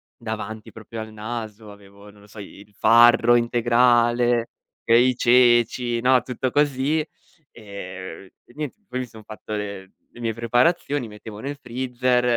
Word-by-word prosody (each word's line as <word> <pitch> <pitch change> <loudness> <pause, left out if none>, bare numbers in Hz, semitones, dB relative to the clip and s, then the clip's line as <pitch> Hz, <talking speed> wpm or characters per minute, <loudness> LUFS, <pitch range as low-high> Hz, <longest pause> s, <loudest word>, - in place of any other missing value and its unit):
davanti 110 -1 -7
proprio 110 +1 -9
al 110 - -9
naso, 110 -1 -7
avevo 100 0 -15
non 105 0 -20
lo 105 - -18
so, 105 +1 -13
i 100 0 -11
il 105 0 -19
farro 120 +1 +5
integrale, 120 0 +2 0.3
e 115 +1 +5
i 130 0 +2
ceci, 120 -1 +3
no, 125 0 +3
tutto 125 +1 -3
così; 145 +2 +1 0.5
ehm, 95 -4 -9 0.2
e 120 - -21
niente, 150 -3 -6
poi 130 - -4
mi 130 - -3
son 110 -2 -15
fatto 110 0 -11
le 100 -2 -6 0.2
le 120 - -11
mie 115 -1 -1
preparazioni, 120 +3 0
mettevo 105 0 -11
nel 140 +5 -6
freezer 125 0 -1
115 Hz, 155 wpm, -22 LUFS, 105-125 Hz, 0.5 s, farro